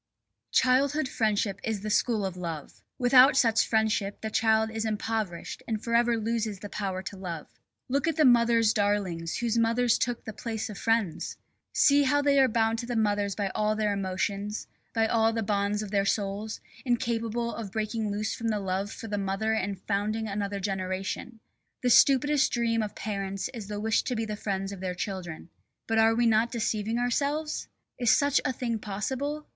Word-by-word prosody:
Childhood 270 +3 +3
friendship 210 -4 0
is 220 -4 -2
the 215 +1 -3
school 220 -2 +1
of 190 -2 -4
love. 165 -5 -6 0.2
Without 255 +2 +6
such 225 -4 +4
friendship 215 -2 0
the 220 - -4
child 220 0 +2
is 220 0 -2
impoverished 215 -4 -3
and 220 -2 -1
forever 235 0 +2
loses 220 -2 -1
the 205 +2 -8
power 190 -2 -3
to 195 - -6
love. 175 -5 -6 0.4
Look 280 +5 0
at 330 - +1
the 310 -2 +4
mothers' 235 -2 +5
darlings 200 -6 0
whose 235 -1 0
mothers 230 +1 +2
took 245 -2 -2
the 220 - -6
place 220 -1 -4
of 200 - -8
friends! 225 -7 0 0.3
See 285 0 +5
how 285 +1 +2
they 280 -1 +4
are 265 - +6
bound 225 -1 +1
to 235 - -5
their 245 -2 -2
mothers 205 -2 +1
by 200 -1 -1
all 215 +2 0
their 210 -1 +1
emotions, 200 +2 -2 0.3
by 225 -1 +2
all 225 0 +2
the 225 0 -1
bonds 205 +1 0
of 205 - -7
their 200 -1 +2
souls, 205 +2 -2 0.2
incapable 235 -2 -1
of 215 -4 -6
breaking 220 0 -2
loose 205 +1 -2
from 230 - -4
the 215 -2 0
love 195 +1 -2
for 225 - -8
the 205 -1 -2
mother 195 +3 -1
and 200 -3 -2
founding 215 +2 -1
another 200 0 -3
generation. 190 +4 -3 0.4
The 250 - +3
stupidest 280 +3 +5
dream 230 -1 +1
of 210 -1 -4
parents 195 -1 -3
is 220 -5 -7
the 205 0 -4
wish 220 +1 +2
to 250 - -1
be 225 0 -1
the 215 -1 -4
friends 195 -1 -3
of 200 - -7
their 185 -1 -3
children. 180 -4 -5 0.4
But 225 0 +1
are 225 0 +5
we 240 +1 +2
not 230 +1 +3
deceiving 220 -1 -1
ourselves? 285 +5 -1 0.3
Is 240 -2 +2
such 285 +2 +4
a - - 0
thing 235 -2 -2
possible? 265 +9 -3
220 Hz, 185 wpm, -28 LUFS, 200-235 Hz, 0.4 s, Without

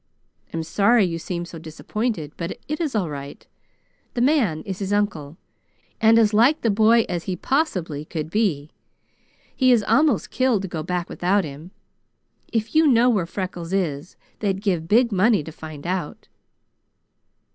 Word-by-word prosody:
I'm 165 0 -3
sorry 200 +6 +3
you 165 -2 -3
seem 175 +1 -4
so 170 -1 -10
disappointed, 165 +2 -4
but 170 +1 -5
it 305 +3 -3
is 300 -7 -2
all 195 -5 0
right. 140 -2 -8 0.7
The 240 - 0
man 240 - +2
is 190 -1 -6
his 195 -1 -3
uncle, 175 -8 -1 0.6
and 225 +1 +6
as 220 -2 +4
like 240 +8 +4
the 230 - +2
boy 225 +2 +4
as 175 -2 -4
he 185 - -2
possibly 180 - -1
could 155 0 -5
be. 165 -9 0 0.8
He 255 -1 +4
is 235 -4 +4
almost 290 -2 +2
killed 255 -6 +1
to - - -3
go 165 -3 -4
back 180 +2 -3
without 190 +3 +1
him. 150 +3 -9 0.8
If 225 -1 -2
you 315 0 +5
know 245 -2 +5
where 190 -7 0
Freckles 180 -1 -5
is, 170 -4 -2 0.2
they'd 195 -3 -1
give 175 -6 0
big 235 +5 +3
money 205 -1 +3
to 160 - -8
find 155 -2 -10
out." 180 -3 -4
190 Hz, 165 wpm, -23 LUFS, 165-225 Hz, 0.8 s, and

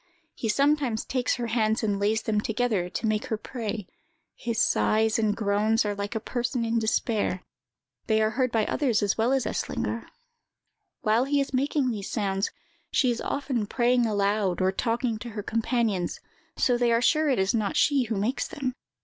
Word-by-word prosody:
He 225 - -3
sometimes 275 -2 +2
takes 255 -1 0
her 245 - -3
hands 225 -1 +1
and 205 -2 0
lays 215 +2 +1
them 210 -1 0
together, 220 -5 0
to 210 - -3
make 215 -1 0
her 220 - -1
pray. 220 -3 -5 0.5
His 230 -2 -3
sighs 220 -1 +2
and 210 -2 +1
groans 215 +1 +2
are 205 - 0
like 205 +2 -4
a - - +1
person 240 +1 -2
in 230 0 +1
despair; 220 -4 0 0.6
they 220 -1 +3
are 215 0 +2
heard 255 +1 0
by 220 -2 +2
others 245 -8 +1
as 200 - +1
well 230 +3 +1
as 270 -2 +1
Eslinger. - - -3 0.9
While 220 +4 +2
he 285 +1 +1
is 275 -1 -2
making 270 0 +1
these 205 -3 -5
sounds, 195 -2 -1 0.4
she 255 -3 +2
is 235 - -3
often 255 -6 -2
praying 240 +1 +2
aloud, 200 -3 +1
or 185 0 +2
talking 230 +2 -1
to 235 - -7
her 205 - -3
companions, 225 -5 0 0.4
so 245 -1 +2
they 240 -1 +3
are 230 - +4
sure 310 +1 +3
it 265 - +2
is 190 +1 +1
not 215 -3 0
she 280 -4 +3
who 220 -1 -2
makes 220 +7 -1
them. 260 -3 -3
225 Hz, 185 wpm, -26 LUFS, 210-245 Hz, 0.9 s, are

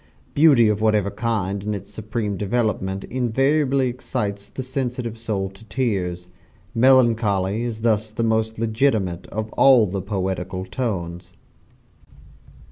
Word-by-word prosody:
Beauty 145 -7 +6
of 105 0 0
whatever 105 -2 +2
kind 100 -4 -2
in 105 0 -2
its 100 +1 -8
supreme 105 -1 -3
development 100 -2 -1
invariably 135 +2 +1
excites 105 -5 -4
the 130 - -6
sensitive 125 -3 -3
soul 110 -4 -2
to 95 +3 -15
tears. 95 -8 -2 0.5
Melancholy 115 -5 +3
is 115 -2 -4
thus 110 -1 +1
the 115 +2 -2
most 110 0 0
legitimate 110 -6 0
of 110 0 -5
all 130 -5 +6
the 95 0 -3
poetical 95 -1 -3
tones. 90 -4 -4
110 Hz, 125 wpm, -22 LUFS, 95-120 Hz, 0.5 s, Beauty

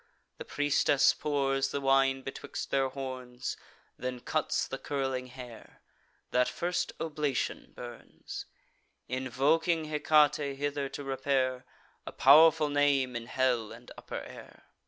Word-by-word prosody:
The - - -6
priestess 145 -1 +3
pours 135 -2 0
the 140 - -2
wine 135 -1 +3
betwixt 135 - -6
their 135 -1 +2
horns; 130 -2 -5 0.4
Then 125 0 -4
cuts - - -1
the - - -5
curling 135 -3 -2
hair; 125 -2 -12 0.5
that 125 0 +3
first 175 +1 -2
oblation 150 -4 -2
burns, 120 -2 -9 0.6
Invoking 145 +6 +1
Hecate 150 -2 +2
hither 145 -1 -2
to 145 - -7
repair: 135 -1 0 0.4
A - - -4
pow'rful 155 +2 +6
name 140 -3 +2
in 115 0 -5
hell 125 -4 0
and 115 +2 -12
upper - - -6
air. - - -12
135 Hz, 120 wpm, -30 LUFS, 130-145 Hz, 0.6 s, pow'rful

